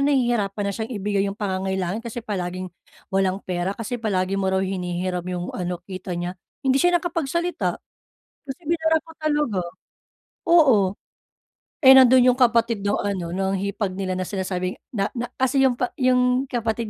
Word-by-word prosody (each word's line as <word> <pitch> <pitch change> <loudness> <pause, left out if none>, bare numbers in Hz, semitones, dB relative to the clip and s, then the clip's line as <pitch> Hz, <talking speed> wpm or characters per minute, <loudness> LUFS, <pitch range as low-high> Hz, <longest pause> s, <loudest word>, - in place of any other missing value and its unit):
nahihirapan 240 -8 +1
na 200 - -1
siyang 220 +3 -5
ibigay 200 0 0
yung 195 - -6
pangangailangan 190 -1 -2
kasi 235 0 -7
palaging, 185 -3 -4 0.4
walang 190 -1 +2
pera 180 +2 -2
kasi 230 +1 -4
palagi 195 -3 0
mo 190 - 0
raw 190 0 +1
hinihiram 180 -1 -2
yung 180 -1 -4
ano 180 -1 -3
kita 185 -2 -6
niya." 175 +1 -3 0.3
Hindi 265 +1 +3
siya 355 0 +4
nakapagsalita, 340 +1 -1 0.7
kasi 275 +3 -7
binara 320 -1 +2
ko 325 - -17
talaga, 295 -10 0 0.9
oo. 310 -10 +6 1.0
Eh, 265 - +10
nandun 260 -1 +7
yung 250 - -4
kapatid 230 -3 +3
nung 205 - +1
ano 190 -4 -2
nung 190 +2 -1
hipag 200 0 -2
nila 185 -1 -3
na 185 - -2
sinasabing 185 -1 -3 0.2
na 200 -4 -2
na 245 0 -4
kasi 260 +1 +2
yung 260 -2 +3
pa 250 - -2
yung 255 0 +2
kapatid 230 -2 -2
205 Hz, 160 wpm, -23 LUFS, 185-255 Hz, 1.0 s, Eh